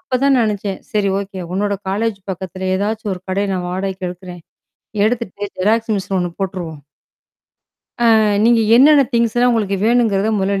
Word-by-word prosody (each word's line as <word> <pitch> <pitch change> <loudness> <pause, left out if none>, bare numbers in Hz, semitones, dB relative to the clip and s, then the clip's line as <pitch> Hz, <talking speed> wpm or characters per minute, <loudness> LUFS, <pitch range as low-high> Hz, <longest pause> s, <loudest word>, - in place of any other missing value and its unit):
அப்பதான் 270 -3 +1
நினைச்சேன். 205 -2 -2
சரி, 205 -2 +1
ஓகே. 195 -1 -7
உன்னோட 205 +1 0 0.2
காலேஜ் 215 +1 -1
பக்கத்துல 185 0 -5
ஏதாச்சும் 210 0 -2
ஒரு 180 - -12
கடை 200 +2 0
நான் 180 -1 -3
வாடகைக்கு 190 0 -3
எடுக்குறேன். 180 -1 -10 0.6
எடுத்துட்டு 215 -4 -3
ஜெராக்ஸ் 220 +3 +1
மிஷின் 195 0 -2
ஒண்ணு 175 -1 -2
போட்ருவோம். 175 -6 -4 1.2
ஆ, - - +5 0.4
நீங்க 235 -1 +4 0.2
என்னென்ன 285 +2 +7
திங்க்ஸ்லாம் 235 +1 +2
உங்களுக்கு 200 -4 0
வேணும்ங்கறத, 220 -3 +2
மொதல்ல 195 0 0
200 Hz, 140 wpm, -18 LUFS, 190-225 Hz, 1.2 s, என்னென்ன